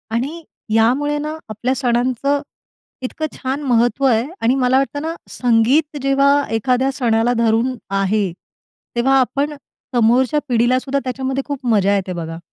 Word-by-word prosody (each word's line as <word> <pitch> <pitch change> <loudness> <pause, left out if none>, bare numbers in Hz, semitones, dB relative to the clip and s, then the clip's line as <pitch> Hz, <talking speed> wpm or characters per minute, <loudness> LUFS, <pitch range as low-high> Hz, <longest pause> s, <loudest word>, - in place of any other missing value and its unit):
आणि 295 +8 -3 0.3
यामुळे 270 +7 +2
ना 305 +2 -4
आपल्या 240 +5 -1
सणांचं 255 +2 0 0.6
इतकं 260 +4 -4
छान 265 +2 -3
महत्त्व 245 0 +2
आहे 230 -2 +3 0.2
आणि 245 +4 +3
मला 250 +1 +3
वाटतं 275 +2 -1
ना 325 +2 -3
संगीत 255 +6 +2
जेव्हा 275 +1 +3 0.2
एखाद्या 255 +4 +1
सणाला 235 -2 +1
धरून 230 +3 +1 0.3
आहे, 195 -1 0 0.6
तेव्हा 270 +3 +3
आपण 280 +3 0 0.4
समोरच्या 245 +5 +3
पिढीलासुद्धा 255 +4 +1
त्याच्यामध्ये 265 +1 -2
खूप 280 -3 -5
मजा 205 -4 +3
येते 190 -2 -2
बघा. 165 -1 -6
255 Hz, 135 wpm, -19 LUFS, 230-275 Hz, 0.6 s, आहे